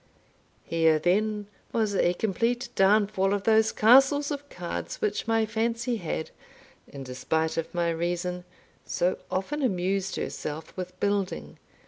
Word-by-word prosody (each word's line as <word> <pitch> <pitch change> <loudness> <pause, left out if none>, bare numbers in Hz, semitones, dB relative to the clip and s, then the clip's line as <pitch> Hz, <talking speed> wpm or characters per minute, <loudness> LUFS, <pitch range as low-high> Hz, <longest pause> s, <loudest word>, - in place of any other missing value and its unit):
Here, 160 -1 +3
then, 210 +5 +1 0.3
was 220 -3 0
a 180 -2 +2
complete 235 +5 -1
downfall 200 0 +3
of 200 - -3
those 220 0 +4
castles 270 +6 +5
of 285 0 -5
cards - - -5
which 425 - -1
my 225 -1 +2
fancy 230 +2 -1
had, 160 -4 -4 0.6
in 140 -1 -9
despite 160 +5 -1
of 165 -1 -3
my 170 -1 0
reason, 175 +2 -2 0.4
so 180 +1 0
often 295 +11 -2
amused 195 -4 0
herself 155 +1 -5
with 185 0 -7
building. 200 -2 -2
200 Hz, 130 wpm, -27 LUFS, 175-225 Hz, 0.6 s, castles